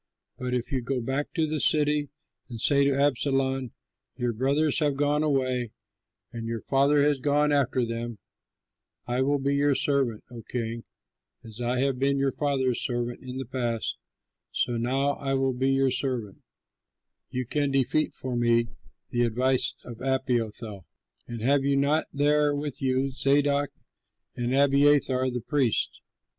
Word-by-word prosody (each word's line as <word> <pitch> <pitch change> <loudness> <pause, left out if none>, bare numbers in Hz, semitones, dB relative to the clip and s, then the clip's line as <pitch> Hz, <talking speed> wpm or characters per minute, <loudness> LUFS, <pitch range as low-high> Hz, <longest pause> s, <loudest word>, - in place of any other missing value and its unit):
But 125 0 -3
if 120 -1 -3
you 130 -2 0
go 130 +2 -2
back 135 +5 -2
to 160 -2 +2
the 155 0 -2
city, 150 -1 +2 0.4
and 115 -2 -7
say 140 +4 +3
to - - +4
Absalom, 135 -2 +1 0.4
'Your 120 -1 -1
brothers 140 +6 +1
have 145 -3 +1
gone 145 +1 +2
away 130 -5 0 0.6
and 115 -1 -5
your 115 -1 -3
father 140 +1 +3
has 145 -1 +2
gone 145 +2 +2
after 130 -3 +2
them; 115 0 -4 0.9
I 125 +1 -1
will 145 +2 +2
be 140 +1 0
your 140 0 +3
servant, 135 -7 0
O 120 -1 -8
king; 115 -1 -4 0.6
as 110 +1 -10
I 120 +1 0
have 135 -2 0
been 140 +1 +2
your 135 0 +1
father's 130 -4 0
servant 120 -1 -2
in 130 0 -7
the 135 - -4
past, 120 -3 -2 0.5
so 120 - 0
now 130 +4 +1
I 135 -1 -1
will 135 -1 +1
be 130 +2 0
your 135 -1 +2
servant,' 125 -7 -3 0.9
you 130 0 -3
can 145 +3 0
defeat 135 +3 +1
for 130 -2 -4
me 120 -1 +2 0.4
the 120 - 0
advice 125 +3 +2
of 120 -1 -9
Ahithophel. 115 - -2 0.4
And 115 -2 -6
have 140 +2 +3
you 140 0 +2
not 145 +3 +2
there 145 0 +2
with 145 -1 -3
you 130 +1 +1
Zadok 140 +1 +2 0.7
and 120 0 -2
Abiathar 140 -2 +4
the 125 -1 -3
priests? 130 -2 0
135 Hz, 155 wpm, -27 LUFS, 120-140 Hz, 0.9 s, to